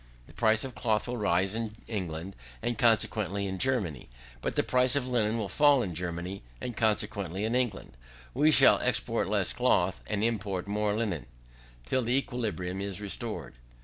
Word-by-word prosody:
The - - -17
price 110 -1 +3
of 130 -2 -6
cloth 110 -2 0
will 125 0 -3
rise 95 -2 +1
in 110 -1 -3
England, 95 -3 -4 0.3
and 120 - 0
consequently 110 -5 +2
in 95 -1 -4
Germany; 95 - 0 0.3
but - - -2
the - - +3
price 125 0 +2
of 140 -3 +1
linen 115 -3 +1
will 110 -3 -2
fall 145 +4 +4
in 90 - -4
Germany, 85 +3 -4 0.2
and 120 - -5
consequently 100 -3 0
in 115 - -1
England, 120 - -2 0.4
We 150 +5 +4
shall 155 - +6
export - - 0
less - - +1
cloth, - - +2
and 105 0 -1
import 100 -5 -1
more 105 +1 0
linen, 100 - -2 0.6
till 130 - +1
the 125 +2 +1
equilibrium 100 -9 -3
is 100 -2 -3
restored. 105 - -5
105 Hz, 170 wpm, -29 LUFS, 95-120 Hz, 0.6 s, shall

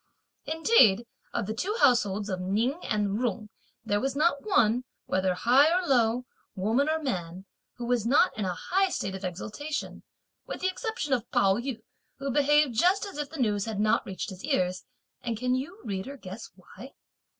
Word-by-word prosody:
Indeed, 310 - +4 0.3
of 235 - -2
the 215 - -3
two 395 - -2
households 210 -7 +3
of 185 -3 -3
Ning 225 - 0
and 210 0 0
Jung, 215 -3 -2 0.4
there 205 0 +1
was 270 +4 -2
not 295 -1 +2
one, 250 - +3 0.2
whether 185 -1 0
high 265 - +5
or 365 +1 +2
low, 245 -3 +2 0.3
woman 225 +10 +1
or 315 - +2
man, 185 - -4 0.3
who 240 - -6
was 245 -2 +1
not 275 +10 +3
in 215 - -3
a 180 -2 -2
high 385 +1 +1
state 195 - -3
of 190 0 -7
exultation, 215 - -5 0.5
with - - -6
the 370 - +2
exception 370 - -3
of 245 -4 -1
Pao 195 0 +3
yü, 240 -2 -4 0.3
who 275 0 -3
behaved 295 0 +3
just 360 - +3
as 390 -7 -8
if 295 -1 -3
the 320 - -9
news 210 -5 +1
had 220 -3 -4
not 215 0 +2
reached 190 0 -5
his 190 0 -10
ears; 180 0 0 0.4
and 230 -2 -3
can 250 +2 0
you, 275 +9 -3
reader, 210 +7 -5
guess 200 -1 -9
why? 240 +8 -13
235 Hz, 185 wpm, -28 LUFS, 200-290 Hz, 0.5 s, high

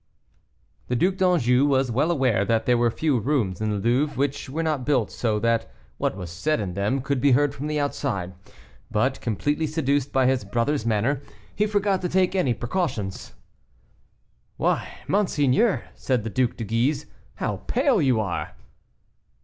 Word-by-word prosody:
The 125 - -1
Duc 185 +9 +1
d'Anjou 145 - +3
was 135 -3 +2
well 140 +8 +1
aware 130 - +2
that 110 +1 +1
there 125 - +4
were 120 0 +3
few 140 +1 0
rooms 110 -7 -1
in 110 - 0
the 105 - -1
Louvre 130 +8 +1
which 140 0 -1
were 160 +5 -2
not 155 -5 -1
built 130 -5 +1
so 110 -3 -1
that 115 +1 0 0.3
what - - -1
was 90 -3 -6
said 155 - 0
in 95 -4 -3
them 105 +8 0
could 140 -1 -1
be 140 -1 +4
heard 145 +2 +3
from 140 +2 -5
the 150 0 -1
outside; 115 -10 -2 0.6
but, 130 +5 0
completely 145 - -1
seduced 145 -3 0
by 130 -1 +2
his 130 -3 +2
brother's 115 +5 -1
manner, 115 +6 +1 0.3
he 210 - +1
forgot 205 -2 +1
to 180 - -2
take 185 0 +2
any 135 -11 +2
precautions. 120 - -3 1.2
"Why, - - 0 0.2
monseigneur," 190 - +2
said 125 -5 -1
the 115 - -4
Duc 130 0 0
de 115 - -4
Guise, 125 +7 0 0.3
"how 105 -3 -2
pale 255 - +2
you 130 -6 +3
are!" 100 -5 -3
130 Hz, 170 wpm, -24 LUFS, 115-150 Hz, 1.2 s, there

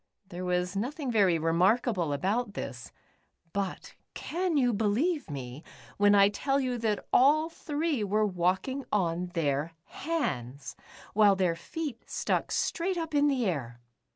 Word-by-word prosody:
There 180 +1 -6
was 180 +1 -1
nothing 260 +6 -2
very 195 -7 +4
remarkable 180 - +2
about 200 +8 -1
this, 120 -2 -6 0.6
but 200 -2 -4 0.2
can 350 -1 -1
you 245 -3 +3
believe 230 - 0
me,, 135 0 -7 0.4
w^hen 205 0 +5
I 200 0 +7
tell 275 +6 0
you 250 -3 -1
that 215 -3 -1
all 305 +5 +5
three 300 -5 -2
were 210 +2 +1
walking 190 +9 0
on. 180 -3 0
their 150 0 0
hands, 140 - -3 0.4
while 205 -1 +5
their 180 -3 +1
feet 285 - -6
stuck - - -1
straight 360 +2 -1
up 325 -2 -4
in 290 0 +4
the 265 -4 +1
air 130 - -3
205 Hz, 140 wpm, -29 LUFS, 175-275 Hz, 0.6 s, I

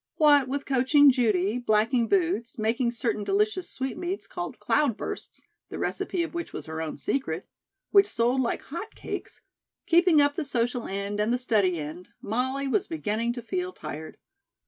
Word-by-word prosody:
What 290 -4 +5
with 280 +2 -3
coaching 275 +2 +5
Judy, 220 -3 +1
blacking 230 +1 +2
boots, 335 - 0
making 230 +3 +1
certain 235 -3 -2
delicious 395 - 0
sweetmeats 345 +9 -4
called - - -6
"cloudbursts," 285 -8 -1 0.3
the - - -6
recipe 355 -2 -1
of 335 - -6
which 340 0 -5
was - - -6
her 160 0 -5
own 160 -1 -4
secret, 275 -1 -2 0.4
which 400 -1 +6
sold 245 - +1
like 240 - -1
hot 340 +9 -7
cakes; - - -6 0.4
keeping 345 -2 +5
up 285 0 +4
the 330 - -2
social 245 -3 -1
end 200 +1 -3
and 210 +2 +1
the 245 - +2
study 210 -8 +1
end, 160 +4 -7
Molly 260 +6 -1
was 390 +9 +1
beginning 235 -7 -1
to 240 -1 -7
feel 365 +8 -2
tired. 155 - -8
250 Hz, 165 wpm, -27 LUFS, 220-305 Hz, 0.4 s, which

